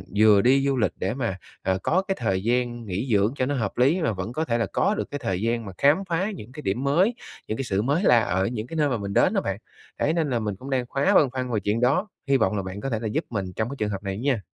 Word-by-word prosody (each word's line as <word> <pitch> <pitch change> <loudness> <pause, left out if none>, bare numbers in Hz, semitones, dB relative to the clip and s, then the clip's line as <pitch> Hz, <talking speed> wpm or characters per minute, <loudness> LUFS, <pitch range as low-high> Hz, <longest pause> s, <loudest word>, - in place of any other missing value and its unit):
vừa 105 -1 +6
đi 135 +4 +4
du 135 - +1
lịch 110 - +2
để 95 - -1
mà, 120 -7 -2 0.3
ờ, 95 0 0
có 185 +3 +2
cái 195 - 0
thời 95 -5 0
gian 120 0 0
nghỉ 100 +5 -3
dưỡng 105 +3 +3
cho 130 - +1
nó 145 - -1
hợp 110 -7 -2
lý, 140 +9 +3
và 115 - +1
vẫn 95 +5 -5
có 160 +4 -1
thể 115 - 0
là 115 - +1
có 210 - +2
được - - -4
cái 145 - -3
thời 95 -8 -2
gian 115 0 -1
mà 95 - -6
khám 145 +2 +5
phá 185 +6 0
những 125 - -10
cái 150 - -8
điểm 110 +7 -1
mới, 180 - +3 0.3
những 110 - -3
cái 135 - -2
sự 95 -1 0
mới 145 - +1
lạ 120 - +6
ở 95 -4 0
những 115 -1 -4
cái 165 - -7
nơi 150 -2 +2
mà 125 - 0
mình 100 -1 -5
đến - - +4
đó - - +1
bạn. - - -3 0.4
Đấy, 155 - +2
nên 165 -3 0
là 120 -3 0
mình 105 -3 -3
cũng 130 +8 -10
đang 130 -2 0
khá 140 - +3
băn 140 - +5
khoăn 130 -1 -3
về 105 - +2
chuyện 105 +3 -1
đó. 140 +11 +2 0.2
Hy 135 -1 +4
vọng 110 -2 +1
là 100 - -2
bạn 95 +2 -6
có 135 - -3
thể 115 -4 -1
là 110 - -3
giúp 105 - -1
mình 100 -5 -2
trong 110 +1 -1
cái 140 - -5
trường 105 - 0
hợp 100 -1 -5
này 95 0 -3
nha. 125 -5 0
120 Hz, 310 wpm, -25 LUFS, 105-140 Hz, 0.4 s, vừa